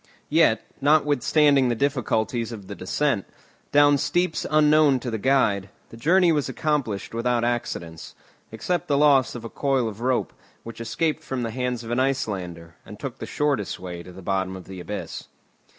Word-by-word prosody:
Yet, - - +3 0.2
notwithstanding 145 -1 +3
the 120 - 0
difficulties 120 -3 -1
of 105 -4 -8
the 100 - -7
descent, 105 +3 -1 0.5
down 145 0 +5
steeps 175 +2 0
unknown 150 -2 +4
to 125 - -4
the 110 - -3
guide, 100 -6 +2 0.2
the - - -12
journey 175 +8 +3
was 150 -3 0
accomplished 140 -12 -2
without 120 0 0
accidents, 85 -9 -3 0.4
except 175 +10 -2
the 140 - +2
loss 140 -4 +4
of 115 -1 -7
a - - -3
coil 135 -3 0
of 110 0 -7
rope, 125 0 0 0.3
which 115 0 -9
escaped 155 +7 -1
from 130 -4 -3
the 115 - -3
hands 125 0 -2
of 115 - -7
an 120 - +1
Icelander, 90 -11 -2
and - - -12
took - - -6
the - - -6
shortest 145 -9 -1
way 90 -1 -7
to 90 - -12
the 95 +1 -12
bottom 95 0 -1
of 95 -2 -10
the 95 +1 -9
abyss. 105 +4 -6
125 Hz, 175 wpm, -24 LUFS, 105-145 Hz, 0.5 s, down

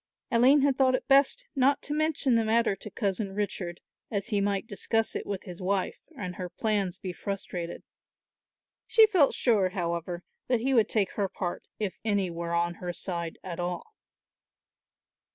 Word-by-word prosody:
Aline 260 +4 +6
had 275 -1 +2
thought 260 -1 +5
best 280 - +4
not 275 +1 +3
to 295 - -2
mention 305 -4 +1
the 230 -1 +4
matter 225 -1 +2
to 210 - -9
Cousin 195 -1 -2
Richard, 185 -4 -3 0.3
as 200 0 -2
he 205 -3 +1
might 200 0 0
discuss 225 +1 0
it - - -4
with 200 -2 -3
his 180 0 -9
wife 190 0 -1 0.2
and 180 -3 -5
her 180 -1 -4
plans 200 -3 -1
be 185 -1 -5
frustrated. 180 -3 -5 1.0
She 445 -1 +7
felt 365 -10 +3
sure, 210 -7 +3
however, 175 -1 -3 0.2
that 245 -3 +2
he 265 +3 +1
would 225 -4 +4
take 205 -4 +1
her 200 -2 -1
part 180 -2 -4
if 205 -3 -3
any 200 -4 +1
were 170 0 -3
on 170 0 +1
her 175 -1 -3
side 170 -2 -4
at 180 -2 -6
all. 175 - -4
200 Hz, 170 wpm, -28 LUFS, 180-240 Hz, 1.0 s, She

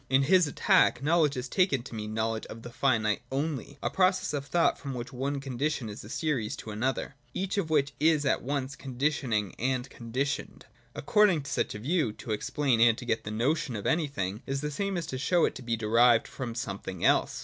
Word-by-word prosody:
In 135 +1 +4
his 180 +3 +4
attack 140 - +3
knowledge 155 -2 +3
is 125 +1 -3
taken 140 -5 +2
to 130 - -10
mean 105 -1 -5
knowledge 110 0 -1
of 115 +1 -10
the 120 - -8
finite 115 -5 +1
onl}', 140 -1 -3
a - - +1
process 185 -2 +2
of 140 -1 -3
thought 170 +4 +2
from 135 -2 -5
one 135 +3 -3
condition 135 -1 -2
in - - -6
a 105 0 -10
series 130 -7 -1
to 110 - -8
another, 130 +6 -2 0.2
each 195 +2 -1
of 165 -5 -2
which 140 -3 +2
is 155 -1 +3
at 140 - +2
once 140 +1 -3
conditioning 130 - -1
and 130 +1 0
conditioned. 130 +4 -3 0.3
According 195 -3 +3
to 140 - -7
such - - -1
a - - -4
view, 140 0 0
to 110 - -7
explain 120 +2 +1
and 115 -1 +6
to 125 - -7
get 115 -2 -1
the - - -4
notion 130 +5 0
of 105 - -5
anything, 140 - -1
is 135 0 -2
the 150 0 -3
same 195 +5 -2
as 170 - -2
to 130 -3 -5
show 175 +5 +3
it - - -1
to - - -9
be 115 -2 -1
derived 115 +2 +4
from 125 -4 -6
something 95 -5 -4
else. - - +3
135 Hz, 210 wpm, -29 LUFS, 115-150 Hz, 0.3 s, and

